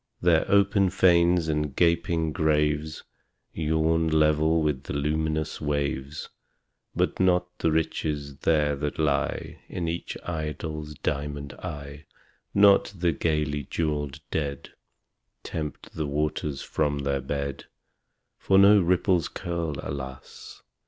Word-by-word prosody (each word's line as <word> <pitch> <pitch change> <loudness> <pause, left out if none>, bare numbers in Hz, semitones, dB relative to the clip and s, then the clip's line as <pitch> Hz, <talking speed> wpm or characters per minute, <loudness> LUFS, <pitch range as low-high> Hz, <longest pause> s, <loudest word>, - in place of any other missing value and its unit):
There 85 -2 +3
open 100 -1 +4
fanes 85 -2 +4
and 75 -3 -1
gaping 85 -1 +2
graves 75 -2 0 0.5
Yawn 80 +1 +1
level 80 +1 +3
with 75 -4 0
the - - -5
luminous 75 +1 -1
waves; 70 -1 -2 0.7
But - - 0
not 90 -1 +3
the 80 - +2
riches 75 -3 -2
there 75 -1 +2
that 75 0 -3
lie 75 -2 -1
In 85 -2 -3
each 85 +1 -4
idol's 75 -2 -4
diamond 70 -1 -3
eye 70 0 -8 0.5
Not 100 -1 +5
the 85 -1 +2
gaily 75 -2 -1
jewelled 75 -2 -2
dead 70 -4 -3 0.7
Tempt 75 -4 -6
the 80 -2 -3
waters 75 -1 -2
from 75 -1 -1
their 70 -1 0
bed; 70 +1 -4 0.7
For 95 - +3
no 100 +1 +7
ripples 90 -1 +2
curl, 85 -3 -3
alas! 65 -2 -8
75 Hz, 115 wpm, -26 LUFS, 75-85 Hz, 0.7 s, no